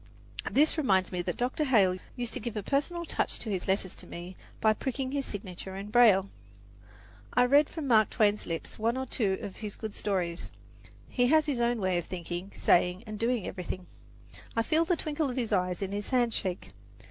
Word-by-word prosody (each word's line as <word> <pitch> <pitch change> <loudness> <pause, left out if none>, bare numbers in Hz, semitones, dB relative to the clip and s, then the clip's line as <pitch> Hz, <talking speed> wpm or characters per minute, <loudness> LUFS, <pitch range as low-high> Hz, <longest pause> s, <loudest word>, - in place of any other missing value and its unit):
This 305 +3 +3
reminds 190 -10 +2
me 180 -1 -1
that 175 -1 -3
Dr. 255 +5 0
Hale 200 -9 +3 0.2
used 240 -2 -4
to - - -2
give 230 -1 -5
a 210 - -2
personal 340 - -1
touch - - -1
to 220 - -5
his 185 -3 -2
letters 190 -1 +1
to - - -11
me 175 +2 -8 0.2
by 220 0 +4
pricking 265 +3 -3
his 280 -1 -2
signature 190 -2 -6
in 200 +2 -6
braille. 215 -5 +6 1.1
I 245 - +6
read 285 +4 +5
from 320 -3 -5
Mark 220 -5 +5
Twain's 210 -2 +2
lips 165 +4 -5
one 230 +3 +1
or 260 - -2
two 205 -6 0
of 195 - -6
his 210 -2 -6
good 220 -2 -6
stories. 180 -4 -2 0.6
He 245 -1 +2
has 310 +3 +4
his 275 -6 -1
own 235 0 +2
way 185 -3 +1
of 170 - -6
thinking, 175 +1 -5
saying 180 +1 +3
and 215 -1 -7
doing 235 -3 0
everything. 185 0 -5 0.7
I 230 - +2
feel 315 +7 +2
the 355 0 +1
twinkle 305 -2 -1
of 250 - -5
his 230 -4 -1
eye 180 -2 +1
in 195 -1 -2
his 205 0 -3
handshake. 230 -8 0
215 Hz, 200 wpm, -29 LUFS, 190-255 Hz, 1.1 s, braille